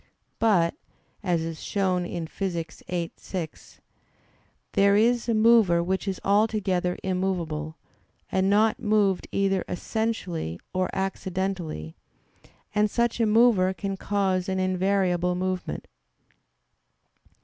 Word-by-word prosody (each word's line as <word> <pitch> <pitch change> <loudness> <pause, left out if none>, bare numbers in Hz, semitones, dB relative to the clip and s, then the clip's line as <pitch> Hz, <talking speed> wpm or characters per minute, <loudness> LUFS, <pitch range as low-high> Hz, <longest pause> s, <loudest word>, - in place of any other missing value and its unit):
But, 185 -7 +3 0.5
as 175 -5 0
is 165 -1 -5
shown 185 -3 0
in 170 -2 -4
Phys. 170 -2 -4
viii, 170 -2 -2
6, 170 -5 -7 0.9
there 200 0 +4
is 235 +3 +3
a 230 - +3
mover 215 -6 +5
which 190 +3 -2
is 190 -1 -2
altogether 200 -3 +1
immovable, 170 -5 -2 0.5
and 190 0 +2
not 215 +4 +3
moved 210 -4 +2
either 195 -1 +1
essentially, 180 - -3
or 185 0 0
accidentally; 190 - -3 0.8
and 210 0 +3
such 235 +2 0
a 225 - +3
mover 210 -4 +4
can 195 0 -3
cause 190 -2 0
an 190 - -1
invariable 185 -1 +1
movement. 185 - -3
190 Hz, 110 wpm, -26 LUFS, 180-205 Hz, 0.9 s, mover